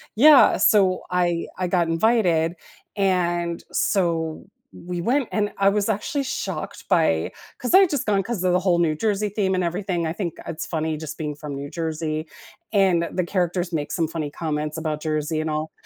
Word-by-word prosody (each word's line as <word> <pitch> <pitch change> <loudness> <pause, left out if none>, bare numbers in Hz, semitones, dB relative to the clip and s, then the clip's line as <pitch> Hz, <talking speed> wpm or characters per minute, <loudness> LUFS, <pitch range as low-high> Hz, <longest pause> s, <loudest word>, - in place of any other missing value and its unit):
Yeah, 285 +5 +7
so 190 -4 +4
I 175 -2 0
I 185 -1 -1
got 175 -2 +1
invited 170 -3 +2 0.4
and, 175 -3 0
so, 165 -5 0 0.3
we 175 0 -6
went, 250 +6 +1
and 210 -1 0
I 195 0 +4
was 205 +1 0
actually 275 +8 -1
shocked 265 - -4
by 160 - +2 0.3
'cause 250 - -3
I'd 380 -1 +7
just 290 -5 -1
gone 200 -2 +2
'cause 195 -2 -4
of 185 - +3
the 180 - +4
whole 180 -2 +2
New 165 -3 +2
Jersey 210 +3 0
theme 190 -2 0
and 185 - 0
everything. 175 0 -2
I 160 - -2
think 175 -3 -3
it's 160 - -5
funny 160 -1 -2
just 155 -1 -7
being 150 -2 -3
from 150 -2 -7
New 140 +1 -6
Jersey 160 -1 -3 0.5
and 185 -4 +3
the 180 - -1
characters 175 -1 -1
make 145 -2 -2
some 165 -2 0
funny 155 -2 -4
comments 150 0 -3
about 155 -1 -3
Jersey 155 0 -1
and 155 - -3
all, 155 +1 -3
175 Hz, 185 wpm, -23 LUFS, 160-195 Hz, 0.5 s, Yeah